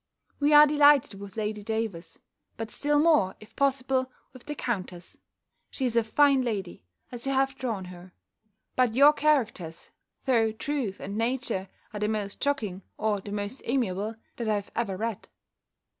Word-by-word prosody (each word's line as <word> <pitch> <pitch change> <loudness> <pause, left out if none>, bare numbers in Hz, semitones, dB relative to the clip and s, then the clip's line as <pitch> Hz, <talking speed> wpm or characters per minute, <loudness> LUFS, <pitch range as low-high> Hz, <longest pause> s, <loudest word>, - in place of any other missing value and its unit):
We 290 +1 +3
are 295 0 +9
delighted 290 -7 +4
with 200 +1 -10
Lady 210 -1 -2
Davers; 210 -6 -4 0.4
but 225 -1 -5
still 295 0 +1
more, 295 - +4
if 215 - -16
possible, 265 -2 +1 0.2
with 255 +1 -14
the 295 - -4
countess: 185 -9 -5 0.5
she 265 - -3
is 240 -2 -1
a 230 - +4
fine 275 +4 +4
lady, 200 - -4 0.3
as 245 +1 -6
you 275 - +1
have 270 0 +2
drawn 230 -8 -4
her: 180 0 -11 0.6
but 250 -3 +2
your 285 +3 +7
characters, 245 - 0 0.3
though 230 -5 +3
truth 255 -5 -3
and 200 +3 -5
nature, 230 -5 -1 0.2
are 210 - -4
the 210 - 0
most 210 -2 -3
shocking, 220 -10 -1 0.2
or 210 -2 0
the 200 - -8
most 205 +5 -4
amiable, 220 -4 -1 0.2
that 235 -2 -2
I 205 -1 +1
ever 200 -5 -1
read. 225 0 -4
225 Hz, 160 wpm, -27 LUFS, 200-270 Hz, 0.6 s, are